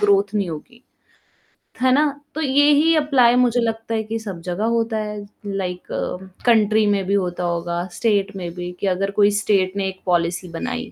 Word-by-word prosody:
Growth 200 Hz, 0 st, +3 dB
नहीं 200 Hz, -4 st, 0 dB
होगी। 235 Hz, +11 st, -10 dB, 1.0 s
है 260 Hz, -, +4 dB
ना? 295 Hz, +3 st, +4 dB, 0.3 s
तो 315 Hz, -, -2 dB
यही 290 Hz, +3 st, +4 dB
एप्लाई 265 Hz, -6 st, +4 dB
मुझे 245 Hz, -1 st, +3 dB
लगता 225 Hz, 0 st, -2 dB
है 220 Hz, -, -1 dB
कि 225 Hz, +1 st, -4 dB
सब 195 Hz, -6 st, -7 dB
जगह 180 Hz, +4 st, -2 dB
होता 225 Hz, -1 st, 0 dB
है, 210 Hz, -1 st, -4 dB, 0.2 s
लाइक 190 Hz, -3 st, -4 dB, 0.6 s
कंट्री 220 Hz, -2 st, +4 dB
में 200 Hz, -1 st, +1 dB
भी 195 Hz, -, -1 dB
होता 180 Hz, -3 st, -1 dB
होगा 170 Hz, 0 st, -2 dB
स्टेट 205 Hz, -2 st, 0 dB
में 180 Hz, -3 st, -5 dB
भी 180 Hz, 0 st, -5 dB
कि 200 Hz, -, -1 dB
अगर 195 Hz, +1 st, 0 dB
कोई 205 Hz, 0 st, +4 dB
स्टेट 200 Hz, -2 st, +1 dB
ने 195 Hz, -1 st, 0 dB
एक 190 Hz, 0 st, -6 dB
पॉलिसी 175 Hz, 0 st, 0 dB
बनाई 85 Hz, -, -5 dB
205 Hz, 180 wpm, -21 LUFS, 185-225 Hz, 1.0 s, है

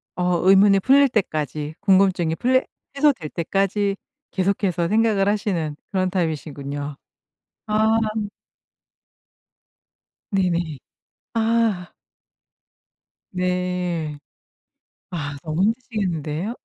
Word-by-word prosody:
어 180 Hz, -1 st, +1 dB
의문이 195 Hz, 0 st, +6 dB
풀릴 275 Hz, +3 st, +5 dB
때까지 155 Hz, -, -2 dB
궁금증이 190 Hz, -4 st, +3 dB
풀릴 260 Hz, +5 st, +2 dB, 0.3 s
해소될 275 Hz, -, +2 dB
때까지 195 Hz, +4 st, 0 dB, 0.4 s
계속해서 185 Hz, -3 st, 0 dB
생각을 215 Hz, -1 st, +2 dB
하시는 190 Hz, -7 st, -1 dB, 0.2 s
그런 185 Hz, -2 st, +1 dB
타입이시군요. 145 Hz, -4 st, -3 dB, 0.7 s
아. 215 Hz, +1 st, +2 dB, 2.4 s
네네. 175 Hz, -5 st, 0 dB, 0.6 s
아. 225 Hz, -5 st, +1 dB, 1.4 s
네. 180 Hz, -4 st, -2 dB, 0.9 s
아 145 Hz, -4 st, -4 dB
너무 160 Hz, +4 st, 0 dB
힘드시겠는데요? 205 Hz, -, -2 dB
185 Hz, 195 characters per minute, -22 LUFS, 160-210 Hz, 2.4 s, 의문이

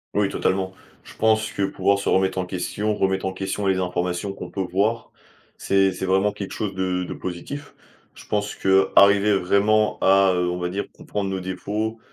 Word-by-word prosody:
Oui 100 Hz, 0 st, +3 dB
totalement. 95 Hz, -1 st, -1 dB, 0.3 s
Je -, -, -14 dB
pense 110 Hz, 0 st, +2 dB
que 100 Hz, -, -4 dB
pouvoir 100 Hz, +1 st, +1 dB
se -, -, -2 dB
remettre 95 Hz, 0 st, +2 dB
en 90 Hz, -, -1 dB
question, 105 Hz, +3 st, -2 dB
remettre 95 Hz, -1 st, 0 dB
en 95 Hz, -, -3 dB
question 95 Hz, +1 st, -3 dB
les 95 Hz, -, +2 dB
informations 90 Hz, +1 st, -2 dB
qu'on -, -, -8 dB
peut 95 Hz, -, -4 dB
voir, 100 Hz, +6 st, -1 dB, 0.5 s
c'est 95 Hz, 0 st, +2 dB
c'est 95 Hz, +1 st, -4 dB
vraiment 95 Hz, +2 st, +2 dB
quelque 100 Hz, -1 st, -7 dB
chose 105 Hz, -3 st, -3 dB
de 95 Hz, -1 st, -1 dB
de -, -, -5 dB
positif. 115 Hz, +12 st, -7 dB, 0.4 s
Je -, -, -13 dB
pense 105 Hz, 0 st, -2 dB
qu'arriver 100 Hz, +2 st, +4 dB
vraiment 105 Hz, +4 st, +2 dB
à, 95 Hz, 0 st, +5 dB
heu, 90 Hz, 0 st, 0 dB
on 90 Hz, -, -2 dB
va 90 Hz, 0 st, -2 dB
dire, 100 Hz, +2 st, -3 dB
comprendre 100 Hz, -2 st, -4 dB
nos 95 Hz, 0 st, -2 dB
défauts, 105 Hz, +5 st, -3 dB
95 Hz, 190 wpm, -23 LUFS, 95-105 Hz, 0.5 s, à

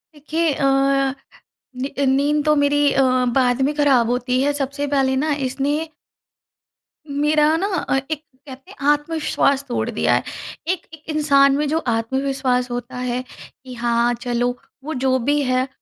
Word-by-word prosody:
देखिए 310 Hz, +2 st, -1 dB
अ, -, -, -3 dB, 1.2 s
नी 275 Hz, -, -3 dB
नींद 285 Hz, +3 st, +2 dB
तो 305 Hz, 0 st, +4 dB
मेरी 285 Hz, 0 st, +2 dB
अ, 270 Hz, -, +3 dB, 0.3 s
बाद 250 Hz, -1 st, +2 dB
में 285 Hz, +3 st, +1 dB
खराब 270 Hz, -6 st, +3 dB
होती 250 Hz, +1 st, 0 dB
है 290 Hz, +1 st, +2 dB
सबसे 285 Hz, 0 st, -3 dB
पहले 270 Hz, -2 st, +1 dB
न 300 Hz, +3 st, 0 dB, 0.2 s
इसने 290 Hz, +4 st, -2 dB, 1.2 s
मेरा 300 Hz, +2 st, +2 dB
ना 385 Hz, +4 st, -1 dB, 0.2 s
अ, -, -, +3 dB
एक 310 Hz, -1 st, -3 dB, 0.2 s
कहते 265 Hz, 0 st, -11 dB
हैं 280 Hz, -, -5 dB
आत्मविश्वास 295 Hz, -2 st, 0 dB
तोड़ 245 Hz, -, -2 dB
दिया -, -, +1 dB
है। -, -, 0 dB, 0.4 s
एक 365 Hz, +1 st, -1 dB
एक 315 Hz, -1 st, -13 dB
इंसान 280 Hz, -2 st, +4 dB
में 300 Hz, 0 st, 0 dB
जो 310 Hz, +3 st, 0 dB
आत्मविश्वास 255 Hz, +2 st, 0 dB
होता 245 Hz, +1 st, -5 dB
है, 250 Hz, 0 st, -2 dB, 0.4 s
कि 255 Hz, -1 st, -9 dB
हाँ 235 Hz, 0 st, +1 dB
चलो, 245 Hz, 0 st, -1 dB, 0.3 s
वो 310 Hz, +3 st, -4 dB
जो 260 Hz, -1 st, +1 dB
भी 290 Hz, +4 st, +1 dB
है, 255 Hz, 0 st, +1 dB
275 Hz, 155 wpm, -21 LUFS, 255-295 Hz, 1.2 s, तो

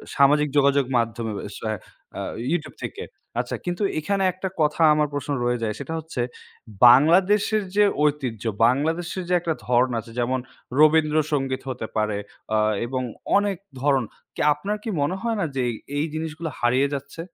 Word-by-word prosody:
সামাজিক 150 Hz, +1 st, +4 dB
যোগাযোগ 140 Hz, -1 st, +4 dB
মাধ্যমে 115 Hz, -1 st, -1 dB, 0.2 s
আস -, -, -9 dB
আ -, -, +1 dB, 0.8 s
YouTube 175 Hz, -, -2 dB
থেকে। 445 Hz, +2 st, -5 dB, 0.4 s
আচ্ছা -, -, -2 dB
কিন্তু 175 Hz, +3 st, -2 dB, 0.2 s
এখানে 195 Hz, +4 st, 0 dB
একটা 190 Hz, 0 st, -4 dB
কথা 150 Hz, +2 st, +1 dB
আমার 150 Hz, 0 st, +2 dB
প্রশ্ন 145 Hz, 0 st, -3 dB
রয়ে 120 Hz, -1 st, 0 dB
যায়, 105 Hz, -1 st, -1 dB
সেটা 150 Hz, +4 st, -5 dB
হচ্ছে 155 Hz, -6 st, -4 dB, 0.7 s
বাংলাদেশের 195 Hz, -, +4 dB
যে 210 Hz, -, +6 dB, 0.2 s
ঐতিহ্য, 135 Hz, -8 st, 0 dB, 0.2 s
বাংলাদেশের 165 Hz, +7 st, -1 dB
যে -, -, +2 dB
একটা 165 Hz, -1 st, -1 dB
ধরণ 125 Hz, +1 st, +3 dB
আছে 115 Hz, -, -10 dB
যেমন 130 Hz, +2 st, 0 dB, 0.4 s
রবীন্দ্রসঙ্গীত 150 Hz, -3 st, +3 dB
হতে 120 Hz, -3 st, -4 dB
পারে 105 Hz, -1 st, 0 dB, 0.4 s
আ -, -, +4 dB, 0.3 s
এবং 130 Hz, +1 st, -2 dB, 0.4 s
অনেক 205 Hz, -3 st, 0 dB, 0.2 s
ধরণ। 135 Hz, -3 st, +3 dB, 0.3 s
কি -, -, -3 dB
আপনার 200 Hz, +8 st, -3 dB
কি 230 Hz, -, -4 dB
মনে 175 Hz, +6 st, 0 dB
হয় 230 Hz, -2 st, -1 dB
না 180 Hz, -, +1 dB
যে 130 Hz, -, 0 dB, 0.4 s
এই 150 Hz, -, +1 dB
জিনিসগুলো 160 Hz, +1 st, -4 dB
হারিয়ে 130 Hz, +3 st, +3 dB
যাচ্ছে? 140 Hz, +4 st, -7 dB
150 Hz, 155 wpm, -24 LUFS, 130-170 Hz, 0.8 s, যে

